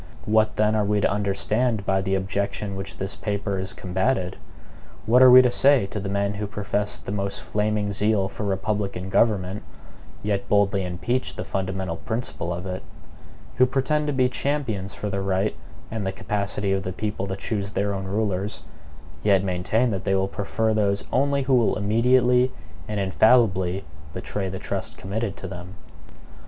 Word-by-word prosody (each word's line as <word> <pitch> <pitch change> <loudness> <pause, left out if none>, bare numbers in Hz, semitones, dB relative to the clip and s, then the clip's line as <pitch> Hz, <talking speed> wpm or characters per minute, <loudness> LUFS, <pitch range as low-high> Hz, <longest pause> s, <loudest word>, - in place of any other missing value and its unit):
What 110 0 +3
then 105 0 +2
are 110 -1 +2
we 105 0 +1
to - - +2
understand 105 +2 0
by 95 0 +2
the 95 0 0
objection 100 +1 -2
which 95 0 -6
this 95 0 -4
paper 100 -2 -2
has 95 +1 -4
combated? 95 +1 -1 0.7
What 120 +3 +5
are 130 - +10
we 130 +1 +10
to 125 - +3
say 135 -3 +4
to 105 +2 -5
the 100 0 -4
men 100 0 0
who 105 0 -4
profess 105 0 -2
the - - -7
most 100 -1 -2
flaming 105 -1 0
zeal 105 -1 +1
for 100 - -6
republican 100 -1 -2
government, 100 -2 +2 0.6
yet 100 -1 -1
boldly 100 -1 +3
impeach 90 +9 -2
the - - -4
fundamental 95 -3 -3
principle 110 -6 -3
of 85 +2 -4
it; 95 0 -4 0.8
who 130 - +6
pretend 150 +3 0
to 145 - 0
be 130 -1 +3
champions 120 -7 -2
for 105 - -4
the 100 0 -1
right 95 +2 0 0.4
and 110 -2 -3
the - - 0
capacity 100 0 -2
of 95 - 0
the 95 0 -4
people 105 -1 -3
to 95 - -3
choose 100 0 -3
their 100 0 0
own 95 -1 -4
rulers, 100 0 -2 0.6
yet 100 0 +3
maintain 100 +6 +1
that 95 -2 -3
they 95 -1 +1
will 95 0 +1
prefer 110 +3 -1
those 100 -2 +1
only 140 +1 +2
who 130 +1 +1
will 120 -3 +4
immediately 125 +4 +3 0.4
and 105 -1 -2
infallibly 95 -2 +3 0.3
betray 95 +1 -3
the 95 - -5
trust 95 0 -4
committed 100 +1 -3
to - - -6
them? 90 0 -8
100 Hz, 175 wpm, -24 LUFS, 95-110 Hz, 0.8 s, are